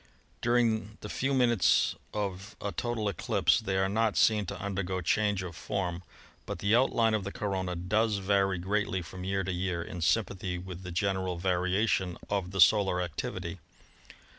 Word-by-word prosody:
During 115 -3 +1
the 105 - -7
few 135 +5 -1
minutes 120 -7 +3 0.2
of 100 0 -4
a 100 - -3
total 120 -2 -2
eclipse 100 +3 +2
they 100 -4 -2
are 95 0 +2
not 110 +2 +1
seen 105 -3 +4
to - - -5
undergo 95 -1 -2
change 100 +2 +1
of 85 -3 -7
form, 90 -3 -3 0.5
but - - -4
the 100 +3 +2
outline 115 -3 +3
of 110 -2 0
the 100 - -4
corona 95 -4 -2
does 105 +5 +1
vary 95 -1 +2
greatly 95 0 -1
from 90 +2 -9
year 95 +1 -1
to 95 - -2
year, 90 -1 -2
in 90 0 -7
sympathy 95 -1 0
with 90 0 -7
the 90 -1 -7
general 95 -1 -1
variation 90 +1 +1
of 95 -3 0
the 95 +1 -5
solar 95 +2 +5
activity. 85 -4 -4
95 Hz, 165 wpm, -30 LUFS, 90-105 Hz, 0.5 s, solar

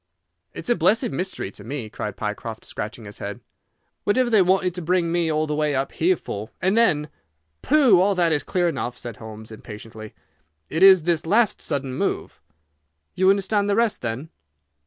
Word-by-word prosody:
"It's - - -3
a - - +4
blessed 220 - +2
mystery 185 - -3
to 100 - -12
me," 120 0 -5
cried 105 -1 -6
Pycroft, 110 +1 -5
scratching 110 +1 -6
his 100 - -10
head. - - -5 0.6
"Whatever 240 +4 +2
they 215 -3 +6
wanted 185 0 +2
to 180 - -5
bring 175 0 +1
me 170 -2 +1
all 155 0 +1
the 150 - -3
way 150 -1 0
up 135 +1 -1
here 180 +3 +2
for, 105 -8 -6
and 190 +2 +1
then—" 175 -11 +3 0.5
"Pooh! 270 -10 +5
All 200 +1 +2
that 170 -2 +2
is 150 -2 +2
clear 180 -1 0
enough," 125 -6 -3
said 120 -3 -7
Holmes 110 0 -10
impatiently. 110 0 -10 0.6
"It 160 - -1
is 190 -3 +8
this 165 -1 0
last 220 +4 +2
sudden 140 -3 -2
move." - - -3 0.7
"You 190 +1 +3
understand 200 +1 +2
the 200 - +2
rest, 230 -1 +1
then?" 125 +7 -4
165 Hz, 180 wpm, -23 LUFS, 120-190 Hz, 0.7 s, is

